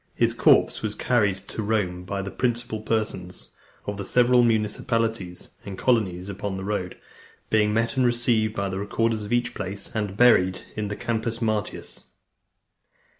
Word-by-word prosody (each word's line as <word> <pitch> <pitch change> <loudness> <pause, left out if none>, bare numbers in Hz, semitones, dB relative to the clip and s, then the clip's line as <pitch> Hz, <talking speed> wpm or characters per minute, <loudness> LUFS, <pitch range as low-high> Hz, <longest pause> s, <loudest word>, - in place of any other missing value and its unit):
His - - +2
corpse - - +4
was 110 -1 -3
carried 105 -7 +1
to - - -4
Rome 100 -5 -1
by 100 +1 -3
the 100 - -5
principal 120 -3 -1
persons 110 0 -3 0.3
of 100 0 -4
the 100 - -4
several 125 +3 +4
municipalities 110 -3 0
and 100 -2 -7
colonies 95 -7 +1
upon 100 0 -4
the 95 - -5
road, 95 -3 -3 0.5
being 105 -1 +3
met 115 +4 0
and 130 - +4
received 120 -3 +2
by 100 0 -1
the 95 0 -3
recorders 110 +1 -1
of 105 - -8
each 120 0 +1
place, 100 +1 -5
and 105 -3 -3
buried 95 -7 +5
in 105 -1 -2
the 105 - -4
Campus 115 0 -2
Martius. 110 -2 -3
110 Hz, 160 wpm, -25 LUFS, 100-115 Hz, 0.5 s, buried